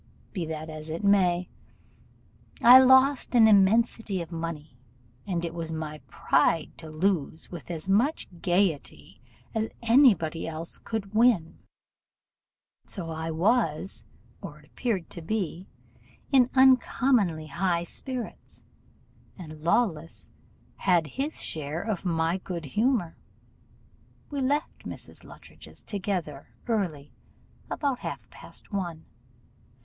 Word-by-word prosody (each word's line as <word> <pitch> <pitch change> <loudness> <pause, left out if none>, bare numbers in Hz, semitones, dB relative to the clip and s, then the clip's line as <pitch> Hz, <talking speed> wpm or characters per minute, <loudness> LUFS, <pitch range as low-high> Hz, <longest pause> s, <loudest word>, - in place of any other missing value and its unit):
Be 175 -5 -3
that 155 0 -5
as 155 0 -8
it 165 +5 -5
may, 185 -3 +3 1.2
I 245 +2 +10
lost 260 0 +4
an 225 -2 +7
immensity 215 0 +3
of 170 0 -7
money, 165 -4 -6 0.5
and 175 -3 -2
it 165 - -5
was 165 -1 -5
my 155 -1 -5
pride 160 +1 +1
to 160 - -10
lose 160 -1 -1
with 175 -2 -9
as 165 0 -4
much 230 +11 +1
gaiety 175 -4 -1 0.3
as 220 -1 -1
any 240 0 +6
body 160 0 -5
else 165 +1 -5
could 215 -3 -5
win; 215 -8 +2 1.3
so 170 -5 -4
I 160 0 -4
was, 180 0 +2 0.3
or - - -8
appeared 210 -9 -3
to 170 - -6
be, 185 -1 -3 0.6
in 255 -3 +5
uncommonly 250 - +3
high 170 +3 -1
spirits, 250 +6 -7 0.7
and 155 -4 -10
Lawless 165 -2 -1 0.5
had 175 -4 +2
his 275 - -3
share 155 +1 -1
of 205 -4 -3
my 165 +1 0
good 175 -3 -6
humour. 210 - 0 1.1
We 285 -1 -2
left 285 +4 -1
Mrs. - - -9
Luttridge's - - -14
together 185 -8 -4
early, 175 -11 -2 0.6
about 275 -4 -1
half - - -6
past - - -10
one. 175 -5 -4
180 Hz, 115 wpm, -27 LUFS, 160-225 Hz, 1.3 s, I